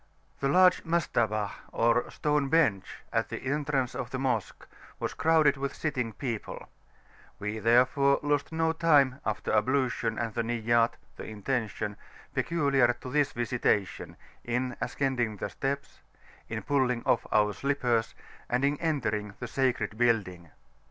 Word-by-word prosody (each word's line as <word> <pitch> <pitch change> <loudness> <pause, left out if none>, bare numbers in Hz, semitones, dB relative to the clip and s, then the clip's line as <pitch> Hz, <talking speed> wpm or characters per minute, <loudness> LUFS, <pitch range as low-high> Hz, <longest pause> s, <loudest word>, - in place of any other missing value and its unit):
The 140 - 0
large 180 +3 +5
Mastabah 110 -11 0 0.2
or 115 +1 +2
stone 150 -2 0
bench 135 - +2 0.3
at - - 0
the - - -4
entrance 140 -2 -1
of 125 -1 -4
the 130 - -4
Mosque 125 -6 -2 0.3
was - - -3
crowded 155 -3 +3
with 140 0 -3
sitting 130 -7 -2
people: 115 -2 -5 0.7
we 105 +2 -4
therefore 130 +5 +4
lost 145 0 0
no 160 0 +1
time, 145 -5 +3
after 110 - -2
ablution 120 0 +1
and 115 -2 -2
the 115 - 0
Niyat 115 0 +1 0.2
("the - - -7
Intention") 110 -2 -3 0.4
peculiar 140 -7 +2
to 125 +1 -9
this 145 0 +2
Visitation, 120 -4 -1 0.3
in 125 +1 -2
ascending 125 -6 -1
the - - -4
steps, 140 +1 -4 0.5
in - - -4
pulling 130 -4 +1
off - - +2
our 105 -1 +3
slippers, 125 -3 0 0.3
and 125 +3 +1
in 145 +1 +1
entering 110 -11 -1
the 125 - -5
sacred 120 -4 -1
building. 95 -8 +1
125 Hz, 140 wpm, -29 LUFS, 115-140 Hz, 0.7 s, large